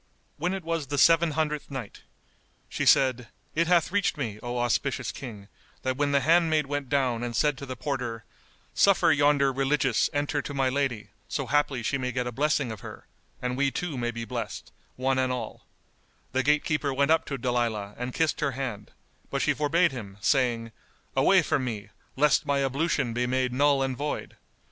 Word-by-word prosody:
When 180 +5 -1
it 190 - -6
was 165 -3 -2
the 145 +2 -3
Seven 165 +2 +5
Hundredth 150 -2 -1
Night, 130 -7 -7 0.7
She - - -2
said, 125 -3 +4 0.3
It 170 +1 +1
hath 175 -1 +3
reached 200 -5 +1
me, 110 -7 -4
O 120 0 -4
auspicious 125 +2 0
King, 105 -7 -9 0.4
that 130 0 0
when 145 +1 0
the 140 -1 +3
handmaid 160 0 +3
went 145 -1 -3
down 130 -4 +1
and 120 -1 -3
said 150 +4 +2
to 140 - -7
the 130 - -5
porter, 125 -5 -4 0.5
"Suffer 200 -4 +4
yonder 145 -2 +3
Religious 135 -1 +1
enter 145 0 -1
to 145 - -7
my 135 -1 +2
lady 130 -7 -2 0.2
so 140 - -2
haply 140 -2 +1
she 140 +4 0
may 125 -1 -2
get 125 0 -2
a 125 - -3
blessing 140 -1 0
of 110 - -7
her, - - -10 0.4
and 125 0 -1
we 140 +1 +2
too 165 +2 -4
may 120 -2 -1
be 115 0 -5
blessed, - - -5 0.2
one 130 +1 0
and 130 -1 +1
all," 125 -1 -6 0.6
the 130 - +1
gate 150 +3 +2
keeper 150 -2 0
went 140 +2 +2
up 160 0 +4
to 135 - -4
Dalilah 115 -5 -1
and 125 +1 -4
kissed 160 +2 0
her 140 -4 0
hand, 120 -6 -5 0.4
but - - -1
she - - +3
forbade 165 +3 +2
him, 105 -7 -8
saying, 120 -1 +1 0.4
"Away - - +5
from - - 0
me, 110 -5 -4 0.3
lest 145 +1 +3
my 140 -1 +2
ablution 140 -2 0
be 125 +1 0
made 130 0 0
null 140 +1 +3
and 130 -1 -2
void. 145 +3 -4
135 Hz, 190 wpm, -27 LUFS, 125-145 Hz, 0.7 s, Seven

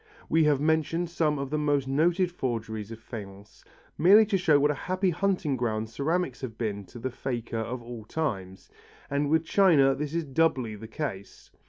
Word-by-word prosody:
We 160 0 +4
have 145 -3 +3
mentioned 160 +3 0
some 155 -3 +1
of 140 0 -4
the 155 - 0
most 145 -3 +1
noted 170 +6 +2
forgeries 115 - -4
of 115 - -7
faience, 100 -3 -10 0.4
merely 205 +6 +7
to 205 -2 +1
show 160 -5 +4
what 145 +1 +3
a 150 - -7
happy 185 0 +1
hunting 175 -4 0
ground 110 -2 -2
ceramics 145 +1 -1
have 115 -4 -6
been 100 -3 -3
to 120 - -13
the 130 +2 -4
faker 120 -2 -4
of 120 +2 -4
all 115 -2 -8
times, 100 -10 -4 0.4
and 140 0 0
with 160 +1 +2
china 155 -9 +5
this 150 +3 -4
is 170 - 0
doubly 135 -5 +1
the 110 +2 -9
case. 110 -7 -6
140 Hz, 185 wpm, -27 LUFS, 115-160 Hz, 0.4 s, merely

